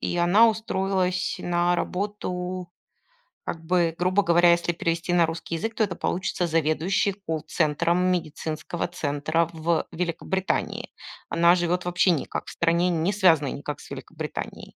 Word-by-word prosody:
и - - -2
она 190 +7 +5
устроилась 190 -4 -1
на 175 0 +1
работу, 180 -1 -3 0.8
как 165 -1 -5
бы, 170 -1 +2
грубо 185 +3 +2
говоря, 175 -1 +5
если 170 0 +2
перевести 170 +1 -1
на 175 - +5
русский 165 +1 -4
язык, 220 +7 -3
то 225 - 0
это 190 - -4
получится 180 -1 -1
заведующей 165 +5 +1
колл-центром 165 -1 0
медицинского 160 0 -3
центра 155 0 -1
в 165 +1 0
Великобритании. 180 +2 -2 0.4
Она 170 +1 +5
живет 175 0 0
вообще 180 +1 +3
никак 160 -6 -2
в - - -8
стране, 170 +1 +1
не 170 +4 0
связанной 165 -8 +3
никак 145 +1 -6
с - - -14
Великобританией. - - -7
175 Hz, 140 wpm, -25 LUFS, 165-185 Hz, 0.8 s, она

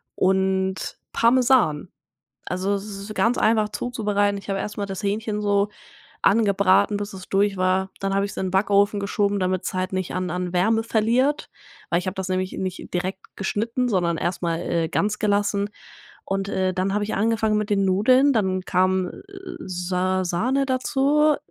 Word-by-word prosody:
und 190 0 0
Parmesan. 230 - +3 0.6
Also, 190 +3 -1
es 200 0 -3
ist 205 0 -7
ganz 235 +2 +2
einfach, 215 -1 +3
zuzubereiten. 205 -4 0
Ich 200 0 -7
habe 195 - -1
erst 210 - -5
mal 205 - -2
das 195 +1 -6
Hähnchen 210 +1 -1
so 205 0 +2 0.5
angebraten, 200 -1 +3
bis 205 0 -5
es 185 -1 -9
durch 200 0 +1
war. 185 +1 +1
Dann 195 0 -1
habe 200 0 +2
ich's 200 - -8
in 185 -1 -2
Backofen 200 +1 +2
geschoben, 200 0 0
damit's 185 0 -1
halt 185 +1 -2
nicht 185 -2 -2
an 185 -1 -2
an 180 +1 -3
Wärme 220 +5 +2
verliert. 235 +6 +1 0.4
Weil 170 - +2
ich 180 - -6
habe 185 - -3
das 190 -1 -4
nämlich 185 0 -1
nicht 185 -1 -5
direkt 185 +2 -4
geschnitten, 230 +5 -1
sondern 175 -5 +1
erst 175 +3 -2
mal, 165 -1 0
äh, 170 -2 -1
ganz 210 +1 0
gelassen. 205 -1 +1 0.6
Und, 195 0 -2
äh, 185 -2 0
dann 190 +1 0
habe 205 0 0
ich 215 - -3
angefangen 220 0 +1
mit 210 0 -2
den 195 -1 +2
Nudeln. 255 +9 +4
Dann 190 -5 0
kam, 185 0 +1
äh, - - -9 0.5
Sa 185 - -1
Sahne 250 +11 0
dazu, 280 +3 +2
200 Hz, 175 wpm, -23 LUFS, 185-215 Hz, 0.6 s, Nudeln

